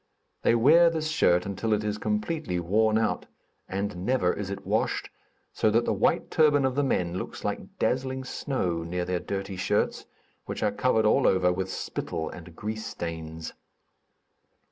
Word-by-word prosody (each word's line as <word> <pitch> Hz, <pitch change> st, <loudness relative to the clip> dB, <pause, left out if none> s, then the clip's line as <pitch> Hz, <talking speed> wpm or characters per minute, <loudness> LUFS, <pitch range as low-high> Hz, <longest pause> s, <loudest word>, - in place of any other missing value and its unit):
They -, -, +4 dB
wear 160 Hz, +9 st, +6 dB
this 160 Hz, -1 st, -2 dB
shirt 90 Hz, -, +3 dB
until 100 Hz, +3 st, -1 dB
it 105 Hz, 0 st, +1 dB
is 105 Hz, 0 st, -2 dB
completely 165 Hz, -, -1 dB
worn 110 Hz, +5 st, +2 dB
out, 110 Hz, -1 st, 0 dB, 0.4 s
and 95 Hz, -2 st, -3 dB
never 120 Hz, -5 st, +2 dB
is 100 Hz, -2 st, -5 dB
it 100 Hz, 0 st, -6 dB
washed, -, -, 0 dB, 0.4 s
so 110 Hz, -, +2 dB
that 115 Hz, +2 st, +2 dB
the -, -, +1 dB
white -, -, +1 dB
turban 145 Hz, -3 st, +4 dB
of 130 Hz, -, +1 dB
the 145 Hz, -, +1 dB
men 90 Hz, -9 st, 0 dB
looks -, -, -7 dB
like -, -, -4 dB
dazzling 130 Hz, +1 st, 0 dB
snow 95 Hz, -, -2 dB
near 90 Hz, +2 st, -3 dB
their 90 Hz, 0 st, -1 dB
dirty 95 Hz, +1 st, -4 dB
shirts, 90 Hz, -, 0 dB, 0.4 s
which -, -, -4 dB
are -, -, +2 dB
covered 110 Hz, -4 st, +2 dB
all 105 Hz, -, +4 dB
over 90 Hz, -1 st, +3 dB
with 95 Hz, +1 st, -3 dB
spittle 80 Hz, -3 st, -4 dB
and 85 Hz, 0 st, -11 dB
grease 110 Hz, +3 st, -4 dB
stains. 80 Hz, -1 st, -6 dB
105 Hz, 165 wpm, -27 LUFS, 90-130 Hz, 0.4 s, wear